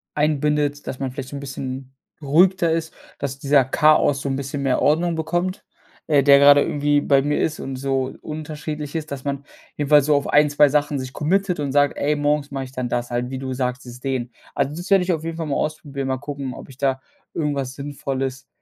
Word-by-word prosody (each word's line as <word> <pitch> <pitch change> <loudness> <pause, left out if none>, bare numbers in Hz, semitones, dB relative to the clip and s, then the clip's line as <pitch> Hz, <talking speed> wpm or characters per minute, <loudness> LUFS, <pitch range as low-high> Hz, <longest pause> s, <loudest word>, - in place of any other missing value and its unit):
einbindet, 150 -1 0
dass 130 - -4
man 135 -2 -3
vielleicht 130 -1 -7
so 145 - -8
'n - - -5
bisschen 135 -1 -6 0.3
beruhigter 170 +4 +3
ist, 160 -1 -2 0.2
dass 135 -1 -3
dieser 140 -1 +4
Chaos 145 +1 +3
so - - -4
'n 135 - 0
bisschen 140 +1 -4
mehr 130 -2 +1
Ordnung 165 +3 +2
bekommt, 175 +4 -2 0.4
äh, 145 -3 +4
der 140 -1 +7
gerade 145 0 +7
irgendwie 145 0 +1
bei 140 -1 +3
mir 145 +1 0
ist 160 - -1
und 135 - -5
so 135 0 -2
unterschiedlich 150 0 -6
ist. 155 -2 -4
Dass 135 -2 -5
man 140 -1 -3 0.3
jedenfalls 145 0 +4
so 150 - +4
auf 140 - +1
1, 150 0 +4
2 145 0 +5
Sachen 145 0 +1
sich 130 0 -6
committed 180 +2 0
und 140 -2 -2
sagt: 145 0 +3
„Ey, 150 +1 +1
morgens 145 0 0
mache 135 -1 -4
ich 130 - -9
dann 125 -2 -3
das 120 0 -2
halt,“ 120 +1 -1
wie 130 - -4
du 130 0 -4
sagt, 125 +1 -2
dieses 125 0 -10
Dehnen. 125 -3 -3 0.2
Also, 145 - 0
das 175 +4 -7
werde 195 -2 +5
ich 180 0 +1
auf 160 -1 -3
jeden 165 0 -4
Fall 165 - -3
mal 140 - -2
ausprobieren, 140 -3 -3
mal 130 0 0
gucken, 140 -2 -6
ob - - -11
ich 130 - -14
da 135 -1 +1 0.4
irgendwas 140 -4 -2
Sinnvolles, 135 -2 -4
145 Hz, 220 wpm, -22 LUFS, 135-150 Hz, 0.4 s, der